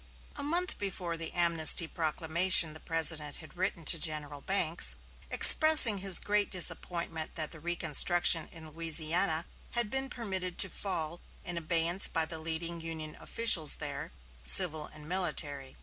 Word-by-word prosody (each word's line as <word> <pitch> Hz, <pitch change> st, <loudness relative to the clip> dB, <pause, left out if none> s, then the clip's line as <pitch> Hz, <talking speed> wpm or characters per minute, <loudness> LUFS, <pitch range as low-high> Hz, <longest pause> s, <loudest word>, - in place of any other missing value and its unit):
A -, -, -8 dB
month 345 Hz, +6 st, -5 dB
before 185 Hz, -4 st, -6 dB
the 165 Hz, -1 st, -6 dB
amnesty 170 Hz, -1 st, +2 dB
proclamation 165 Hz, +1 st, 0 dB
the 155 Hz, -, -13 dB
President 160 Hz, -3 st, +1 dB
had 160 Hz, -, -15 dB
written 180 Hz, -2 st, -5 dB
to 165 Hz, -, 0 dB
General 150 Hz, -2 st, -6 dB
Banks, 175 Hz, -3 st, -1 dB, 0.3 s
expressing 310 Hz, -10 st, +7 dB
his 190 Hz, -2 st, +2 dB
great 205 Hz, 0 st, -2 dB
disappointment 170 Hz, -3 st, -4 dB
that 155 Hz, -2 st, -3 dB
the 160 Hz, -, -13 dB
reconstruction 170 Hz, 0 st, +1 dB
in 160 Hz, -2 st, -14 dB
Louisiana 165 Hz, +1 st, 0 dB, 0.3 s
had 235 Hz, -3 st, 0 dB
been 265 Hz, 0 st, -4 dB
permitted 190 Hz, -6 st, -7 dB
to 195 Hz, -, +5 dB
fall 170 Hz, -4 st, -5 dB, 0.2 s
in 175 Hz, -, -7 dB
abeyance 170 Hz, +2 st, +2 dB
by 165 Hz, -1 st, -2 dB
the 160 Hz, 0 st, -9 dB
leading 165 Hz, +1 st, -3 dB
Union 160 Hz, -2 st, -7 dB
officials 190 Hz, -10 st, +3 dB
there, -, -, -7 dB, 0.3 s
civil 150 Hz, -, +5 dB
and 150 Hz, 0 st, -15 dB
military. 150 Hz, -7 st, -5 dB
170 Hz, 145 wpm, -28 LUFS, 160-185 Hz, 0.3 s, expressing